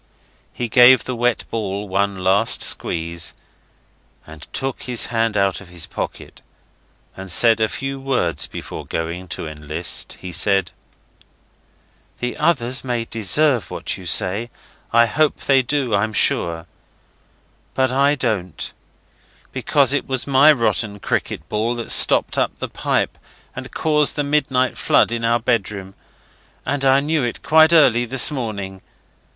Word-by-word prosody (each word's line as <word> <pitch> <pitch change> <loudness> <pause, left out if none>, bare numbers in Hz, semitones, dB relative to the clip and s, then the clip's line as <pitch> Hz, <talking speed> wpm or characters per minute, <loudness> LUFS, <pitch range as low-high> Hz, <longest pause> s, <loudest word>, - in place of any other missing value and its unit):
He 120 - -4
gave 125 +2 +6
the 130 - -4
wet 120 0 0
ball 105 -2 -3
one 95 0 -1
last 100 +4 +3
squeeze, 85 0 -1 0.9
and 80 0 -13
took 135 -1 -4
his 125 -2 -2
hand 115 -2 0
out 100 -1 0
of 100 - -13
his 85 -2 -5
pocket, - - -7 0.7
and 95 -1 -6
said 115 +4 +5
a 110 0 +1
few 135 0 -5
words 125 - -1
before - - -8
going 85 +3 -5
to 80 -1 -5
enlist. 75 +2 -3
He 90 - -8
said 95 +2 +1 1.5
'The 125 0 -4
others 130 -6 0
may 120 -3 -2
deserve 115 +4 +1
what - - -3
you - - -10
say. 105 +6 0 0.4
I 115 0 +5
hope 150 +6 0
they 135 -1 +3
do, 130 -2 -1
I'm 110 +2 0
sure. 85 -4 0 1.1
But 130 -1 +1
I 140 +2 +2
don't, 105 - -3 0.8
because 140 -2 +2
it 145 - -1
was 130 -2 -1
my 140 +2 +6
rotten 115 -6 0
cricket 80 -4 -3
ball 110 +3 -1
that 120 -1 -4
stopped - - +4
up - - -1
the - - -5
pipe - - -2 0.4
and - - -7
caused 150 -2 +1
the 145 - -1
midnight 140 -3 0
flood - - +3
in 115 0 -3
our 115 +1 +2
bedroom. 100 -5 -2 0.7
And 140 +1 -2
I 135 0 +4
knew 150 0 0
it 120 - -4
quite 160 +2 +5
early 125 -7 +4
this 130 +4 +2
morning. 100 -8 -5
115 Hz, 145 wpm, -20 LUFS, 95-135 Hz, 1.5 s, gave